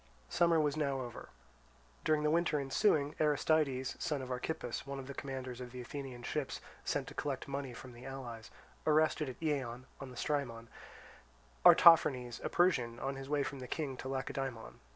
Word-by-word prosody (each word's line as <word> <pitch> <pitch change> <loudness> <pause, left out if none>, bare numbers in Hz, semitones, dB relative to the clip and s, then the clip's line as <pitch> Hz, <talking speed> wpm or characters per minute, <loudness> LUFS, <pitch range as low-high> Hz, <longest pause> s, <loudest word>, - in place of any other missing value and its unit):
Summer 170 -1 +4
was 150 -2 +2
now 140 -3 0
over. 120 -2 -7 0.7
During 155 -1 +2
the 150 - +3
winter 165 -2 +2
ensuing, 145 +1 +2
Aristides, 150 -3 +2
son 150 -6 -1
of 130 - -6
Archippus, 125 0 -3
one 140 0 -4
of 135 - -6
the 140 - -6
commanders 130 -2 -5
of 125 -1 -7
the 125 - -7
Athenian 130 -1 -7
ships - - -2 0.2
sent - - -1
to - - -10
collect 135 -3 -3
money 140 -1 -3
from 125 +1 -10
the 120 +1 -12
allies, 120 -4 -7 0.4
arrested 155 -1 +3
at 130 - -9
Eion, 130 -6 -1 0.2
on 135 - -7
the 125 - -11
Strymon, 120 -6 -2 0.9
Artaphernes, 155 -8 +7
a - - -1
Persian, 135 -10 +2
on 135 +1 -2
his 135 0 -7
way 145 -1 +2
from 140 0 -5
the 125 - -7
King 145 -3 -3
to 130 - -6
Lacedaemon. 135 -3 -4
135 Hz, 175 wpm, -34 LUFS, 125-150 Hz, 0.9 s, Artaphernes